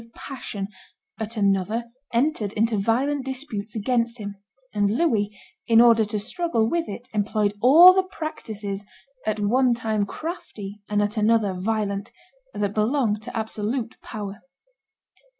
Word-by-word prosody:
with 230 Hz, -, -20 dB
passion, 210 Hz, -7 st, -6 dB, 0.5 s
at 220 Hz, +1 st, -4 dB
another 205 Hz, +4 st, +1 dB, 0.2 s
entered 235 Hz, -4 st, +1 dB
into 225 Hz, +1 st, +1 dB
violent 255 Hz, +7 st, +1 dB
disputes 255 Hz, -6 st, -5 dB
against 235 Hz, +2 st, +1 dB
him; 205 Hz, -2 st, -6 dB, 0.4 s
and 205 Hz, -1 st, +2 dB
Louis, 220 Hz, -4 st, +2 dB, 0.4 s
in 230 Hz, -1 st, +6 dB
order 230 Hz, -2 st, +6 dB
to 210 Hz, 0 st, -3 dB
struggle 235 Hz, -, 0 dB
with 335 Hz, -2 st, -1 dB
it, 240 Hz, +5 st, -7 dB
employed 210 Hz, 0 st, +1 dB
all 330 Hz, +9 st, +9 dB
the 380 Hz, -, +4 dB
practices, 220 Hz, -, -5 dB, 0.4 s
at 215 Hz, 0 st, 0 dB
one 240 Hz, +4 st, +3 dB
time 220 Hz, -3 st, -1 dB
crafty 210 Hz, -, -7 dB
and 210 Hz, 0 st, +2 dB
at 205 Hz, +2 st, -2 dB
another 215 Hz, -2 st, +3 dB
violent, 200 Hz, +1 st, -2 dB, 0.4 s
that 205 Hz, -1 st, -1 dB
belong 215 Hz, 0 st, +1 dB
to 215 Hz, -, -7 dB
absolute 220 Hz, +2 st, -2 dB
power. 205 Hz, -1 st, -7 dB
220 Hz, 135 wpm, -24 LUFS, 205-245 Hz, 0.5 s, all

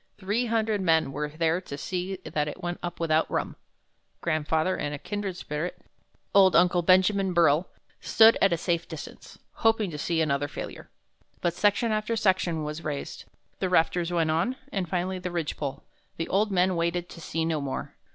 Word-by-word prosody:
Three 210 Hz, +5 st, -1 dB
hundred 220 Hz, -2 st, 0 dB
men 160 Hz, -5 st, +2 dB
were 150 Hz, +2 st, -3 dB
there 165 Hz, +3 st, 0 dB
to 140 Hz, -6 st, -7 dB
see 185 Hz, +4 st, -3 dB
that 150 Hz, -1 st, -1 dB
it 175 Hz, +5 st, -7 dB
went 175 Hz, 0 st, -3 dB
up 175 Hz, 0 st, -5 dB
without 160 Hz, -1 st, +2 dB
rum. -, -, -2 dB, 0.6 s
Grandfather 160 Hz, +2 st, 0 dB
and 145 Hz, 0 st, -3 dB
a -, -, -5 dB
kindred 200 Hz, +2 st, -4 dB
spirit, 150 Hz, +3 st, -4 dB, 0.5 s
Old 190 Hz, -2 st, +6 dB
Uncle 175 Hz, 0 st, +4 dB
Benjamin 185 Hz, +2 st, +3 dB
Burrill, 170 Hz, 0 st, +4 dB, 0.3 s
stood 225 Hz, 0 st, +6 dB
at 195 Hz, -, +5 dB
a 170 Hz, -, +2 dB
safe 170 Hz, 0 st, -1 dB
distance, 160 Hz, -3 st, -9 dB, 0.2 s
hoping 225 Hz, -4 st, +2 dB
to 150 Hz, -, -6 dB
see 165 Hz, +2 st, 0 dB
another 145 Hz, -2 st, +1 dB
failure. -, -, -8 dB, 0.5 s
But 175 Hz, -, 0 dB
section 205 Hz, +5 st, +2 dB
after 215 Hz, +1 st, 0 dB
section 185 Hz, -6 st, +1 dB
was 150 Hz, +2 st, -5 dB
raised. 145 Hz, -2 st, -5 dB, 0.3 s
The 190 Hz, -, 0 dB
rafters 175 Hz, 0 st, +2 dB
went 165 Hz, -2 st, +1 dB
on, 170 Hz, +11 st, 0 dB, 0.2 s
and 185 Hz, -4 st, -2 dB
finally 185 Hz, +1 st, -1 dB
the 180 Hz, 0 st, -4 dB
ridge 170 Hz, -3 st, -2 dB
pole. 140 Hz, 0 st, -5 dB, 0.3 s
The 165 Hz, -, -2 dB
old 210 Hz, +3 st, +2 dB
men 185 Hz, 0 st, +2 dB
waited 170 Hz, +1 st, -1 dB
to 170 Hz, -, -11 dB
see 160 Hz, 0 st, -2 dB
no 160 Hz, -2 st, -1 dB
more. 140 Hz, -1 st, -4 dB
175 Hz, 180 wpm, -27 LUFS, 160-190 Hz, 0.6 s, Old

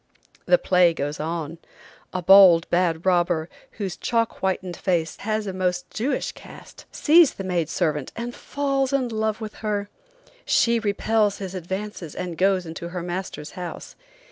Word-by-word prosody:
The -, -, +6 dB
play 180 Hz, -, +3 dB
goes 145 Hz, 0 st, -3 dB
on. 165 Hz, 0 st, -4 dB, 0.5 s
A 185 Hz, -1 st, -3 dB
bold, 185 Hz, -3 st, +7 dB
bad 170 Hz, -1 st, +1 dB
robber, 175 Hz, -3 st, +2 dB, 0.3 s
whose 195 Hz, -5 st, -4 dB
chalk 230 Hz, -1 st, -1 dB
whitened 185 Hz, -1 st, -2 dB
face 170 Hz, -4 st, -1 dB
has 215 Hz, 0 st, -2 dB
a 195 Hz, -, -4 dB
most 180 Hz, -1 st, -2 dB
Jewish 250 Hz, +6 st, -2 dB
cast, -, -, -14 dB
sees 320 Hz, 0 st, +5 dB
the 195 Hz, -, -6 dB
maid 175 Hz, -4 st, -1 dB
servant 150 Hz, -6 st, -1 dB
and 240 Hz, +1 st, -5 dB
falls 275 Hz, -1 st, -1 dB
in 260 Hz, -3 st, +1 dB
love 220 Hz, -1 st, -1 dB
with 215 Hz, -1 st, -6 dB
her. 205 Hz, -2 st, -2 dB, 0.5 s
She 235 Hz, -, +3 dB
repels 210 Hz, 0 st, +1 dB
his 190 Hz, -2 st, -6 dB
advances 190 Hz, -2 st, -5 dB
and 180 Hz, -2 st, -4 dB
goes 190 Hz, 0 st, +2 dB
into 165 Hz, +1 st, -7 dB
her 175 Hz, -1 st, -5 dB
master's 175 Hz, -4 st, -5 dB
house. 180 Hz, -2 st, -8 dB
185 Hz, 155 wpm, -24 LUFS, 170-215 Hz, 0.5 s, bold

